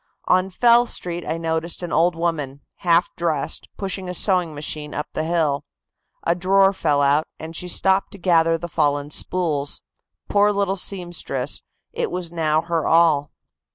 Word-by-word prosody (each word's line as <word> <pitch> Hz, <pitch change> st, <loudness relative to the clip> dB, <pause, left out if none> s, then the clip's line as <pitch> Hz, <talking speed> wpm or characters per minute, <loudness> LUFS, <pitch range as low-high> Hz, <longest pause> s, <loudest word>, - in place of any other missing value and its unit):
On 185 Hz, +1 st, +2 dB
Fell 240 Hz, +5 st, +4 dB
Street 175 Hz, -4 st, -2 dB
I 160 Hz, -, -1 dB
noticed 165 Hz, +1 st, -2 dB
an 175 Hz, -, -4 dB
old 170 Hz, +2 st, +3 dB
woman, 150 Hz, -5 st, -2 dB, 0.2 s
half 170 Hz, -1 st, +2 dB
dressed, 160 Hz, -5 st, -2 dB
pushing 190 Hz, -2 st, -3 dB
a 180 Hz, -, -3 dB
sewing 180 Hz, -5 st, +2 dB
machine 150 Hz, 0 st, -4 dB
up 150 Hz, -, -2 dB
the 155 Hz, -, -1 dB
hill. 155 Hz, -4 st, 0 dB, 0.6 s
A 170 Hz, -, +2 dB
drawer 195 Hz, +2 st, +3 dB
fell 150 Hz, -6 st, +1 dB
out, 145 Hz, +3 st, +3 dB
and 160 Hz, +1 st, -8 dB
she 180 Hz, -, -2 dB
stopped 190 Hz, +2 st, +2 dB
to -, -, -8 dB
gather 165 Hz, -3 st, +3 dB
the 175 Hz, +1 st, -6 dB
fallen 145 Hz, -2 st, 0 dB
spools. 150 Hz, -5 st, -1 dB, 0.5 s
Poor 205 Hz, 0 st, +3 dB
little 200 Hz, -1 st, 0 dB
seamstress, 175 Hz, -8 st, -1 dB, 0.3 s
it -, -, -2 dB
was 180 Hz, -2 st, -4 dB
now 160 Hz, -2 st, +1 dB
her 165 Hz, -2 st, -1 dB
all." 160 Hz, -3 st, +4 dB
170 Hz, 160 wpm, -22 LUFS, 155-180 Hz, 0.6 s, Fell